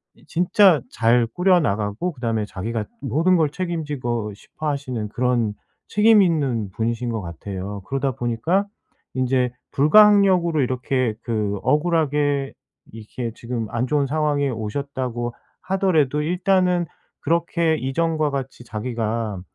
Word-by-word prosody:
이 - - -23
진짜 180 -1 +4
잘 115 +1 +3
꾸려 180 +9 +3
나가고 105 - -1
그다음에 115 -5 -2
자기가 110 +3 -4 0.2
모든 160 +8 +2
걸 155 -3 +2
책임지고 145 - -3
싶어 155 +9 -8
하시는 130 -6 -3
그런 120 -2 0 0.3
책임 215 0 +5
있는 140 - +1
분이신 115 +4 -2
것 115 -2 -2
같아요. 95 +3 -6
그러다 135 0 -1
보니까 120 - 0 0.5
인제 130 -1 +1 0.2
불가항력으로 185 0 +5
이렇게 130 -2 0
그 105 -3 -1
억울하게 145 -2 +1 0.4
이렇게 115 +2 -6
지금 115 -2 -4
안 120 +2 -1
좋은 145 0 +1
상황에 145 -1 0
오셨다고 120 +1 -4 0.3
하더라도 165 -7 +1
일단은 180 +1 +1 0.3
그렇게 170 0 +1
이전과 155 +3 0
같이 135 -2 -5
자기가 110 -3 -3
135 Hz, 295 characters per minute, -22 LUFS, 115-160 Hz, 0.5 s, 책임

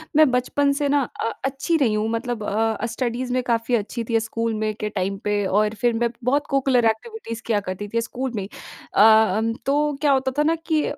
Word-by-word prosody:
मैं 310 -2 +6
बचपन 280 +3 +1
से 285 -1 0
ना 285 0 +3 0.2
अ, 225 - 0 0.2
अच्छी 275 +5 0
रही 255 -8 +2
हूँ 215 +1 0
मतलब 230 -1 -3
अ, 220 +1 0
स्टडीज़ 245 +1 -3
में 255 - +1
काफ़ी 235 0 0
अच्छी 230 +2 -3
थी, 230 -1 +3
स्कूल 230 +1 -2
में 215 0 -1
के 210 - -2
टाइम 195 -1 -2
पे 205 -1 +1
और 210 +3 +2
फिर 240 -1 +3
मैं 235 +1 +1
बहुत 280 +4 +1
कोकुलर 265 -3 +2
एक्टिविटीज़ 230 - -5
किया 220 -3 +2
करती 205 +3 -4
थी 230 - +2
स्कूल 255 +3 -4
में। 195 -2 -3 0.5
अ, - - +5
अम 220 0 +4
तो 295 +2 +1
क्या 295 -2 +3
होता 265 -1 +2
था - - +4
ना 320 +2 +2
कि 310 -2 +2
230 Hz, 215 wpm, -23 LUFS, 220-270 Hz, 0.5 s, मैं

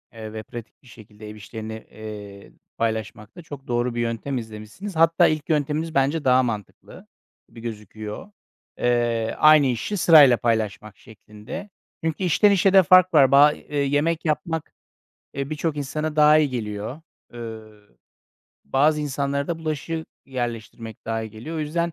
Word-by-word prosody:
ııı, 110 -1 -8
ve 110 0 -6
pratik 120 +3 -11
bir - - -19
şekilde 105 -2 -13
ev 105 - -9
işlerini, 110 +1 -8 0.2
eee, 105 -2 -10 0.3
paylaşmakta 110 - -4
çok 145 -4 -11
doğru 120 0 -1
bir 120 - -1
yöntem 115 +4 -3
izlemişsiniz. 110 - -8
Hatta, 165 +2 +4
ilk 155 0 -2
yönteminiz 155 +1 -1
bence 145 +3 +1
daha 130 0 +5
mantıklı 110 -5 -7 0.4
gibi 115 - -14
gözüküyor. 110 - -8 0.5
Eee, 120 -2 0
aynı 155 -2 +6
işi 125 - -2
sırayla 145 -8 +7
paylaşmak 110 -3 -2
şeklinde. 110 - -10 0.3
Çünkü 160 +3 -2
işten 200 +4 +4
işe 195 0 +3
de 190 -1 +7
fark 185 0 +5
var. 140 -3 +6
Ba 145 +2 +7
e 150 - -8
yemek 145 +4 0
yapmak, 160 +1 -2 0.6
e, 140 +1 -3
birçok 155 0 -2
insana 150 +2 -3
daha 150 0 +6
iyi 150 -3 +2
geliyor. 110 +4 -5 0.3
Iıı, 110 -3 -10 0.7
bazı 150 +3 +2
insanlara 140 0 -2
da 165 -1 -2
bulaşık 160 +1 -4 0.2
yerleştirmek 115 -3 -6
daha 115 0 -2
iyi 110 - -7
geliyor. 120 +10 -8
O - - -2
yüzden 170 +3 -2
135 Hz, 150 wpm, -23 LUFS, 110-155 Hz, 0.7 s, sırayla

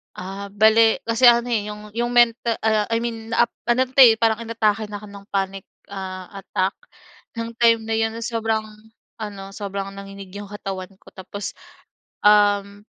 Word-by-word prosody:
Ah, 195 +2 -6
bale 220 +2 +5
kasi 230 +2 +4
ano 240 0 +5
eh, 210 -3 0
yung 210 0 -8
yung 240 +2 -2
menta 235 -1 +3
ah, 215 -1 +2
I 230 0 0
mean, 230 -1 -5
na, 235 - +5 0.2
ano 240 +2 +3
'to, 260 +1 -2
eh, 235 -4 +9
parang 225 0 +1
inatake 225 -2 0
na 205 -1 -7
'ko 210 - -10
ng 200 0 -12
panic 195 -1 -3 0.3
ah, 185 -2 -6
attack 190 0 -1 0.6
nung 230 0 -4
time 230 -1 +4
na 225 0 -2
'yon, 225 0 0
sobrang 225 -1 -1 0.6
ano, 205 -2 -6
sobrang 195 -1 -5
nanginig 195 -1 -10
yung 205 - -7
katawan 195 -2 -7
ko, - - -16
tapos, 195 +2 -7 0.7
um, 205 0 +3
210 Hz, 165 wpm, -22 LUFS, 200-230 Hz, 0.7 s, eh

